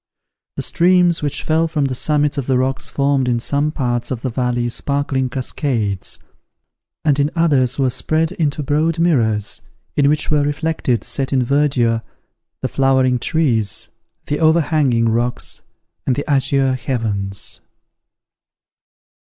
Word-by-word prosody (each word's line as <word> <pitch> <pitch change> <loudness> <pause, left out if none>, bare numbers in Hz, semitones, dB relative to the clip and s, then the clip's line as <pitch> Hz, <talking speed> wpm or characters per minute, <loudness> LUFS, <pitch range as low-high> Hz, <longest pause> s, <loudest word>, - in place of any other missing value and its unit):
The - - -2
streams 175 -1 +3
which 145 -2 -1
fell 160 +1 +2
from 155 -3 0
the 135 - -1
summits 150 +2 +1
of 130 - -5
the 130 -2 +2
rocks 130 +1 -1
formed 140 -2 +1
in 120 -1 +1
some 145 +5 0
parts 120 -5 -2
of 125 -3 -4
the 130 - -1
valley 120 0 -1
sparkling 140 0 -1
cascades, 120 -6 -2 0.9
and 145 -2 +3
in 145 +1 +2
others 145 -7 +2
were 135 -2 +1
spread 160 +5 0
into 150 -5 -1
broad 155 +4 +1
mirrors, 115 - +1 0.3
in 140 -1 +3
which 150 +1 +1
were 150 -1 +3
reflected, 145 -6 -1
set 135 -1 -2
in 130 -2 +2
verdure, 125 -4 +1 0.6
the - - 0
flowering 130 -2 +2
trees, 120 - 0 0.4
the 145 - -2
overhanging 155 -7 +3
rocks, 120 +2 -1 0.5
and 130 - +2
the 145 - -4
azure 135 -1 +2
heavens. 110 -7 -3
135 Hz, 135 wpm, -19 LUFS, 125-150 Hz, 0.9 s, streams